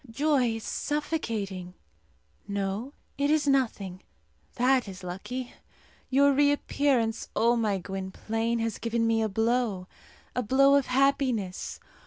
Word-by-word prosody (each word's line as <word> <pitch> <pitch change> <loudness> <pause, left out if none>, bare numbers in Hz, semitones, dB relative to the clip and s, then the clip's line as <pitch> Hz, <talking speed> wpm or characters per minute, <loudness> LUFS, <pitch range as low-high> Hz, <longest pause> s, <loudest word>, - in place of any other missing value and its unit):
Joy 255 -1 +1
is 225 - -6
suffocating. 220 - -3 0.7
No, 200 +6 -3 0.3
it 285 +1 +2
is 305 -1 +2
nothing! 215 -9 0 0.5
That 255 -1 +3
is 190 -1 -9
lucky. 240 +8 -5 0.6
Your 280 +2 +5
reappearance, 280 -4 +1
O 235 +2 +3
my 215 -4 +1
Gwynplaine, 195 +5 -3
has 230 -1 -2
given 230 0 0
me 225 0 +2
a 220 - 0
blow 225 -2 0 0.5
a 250 - +1
blow 270 +4 +4
of 280 -2 +3
happiness. 255 -7 0
230 Hz, 120 wpm, -28 LUFS, 200-275 Hz, 0.7 s, Your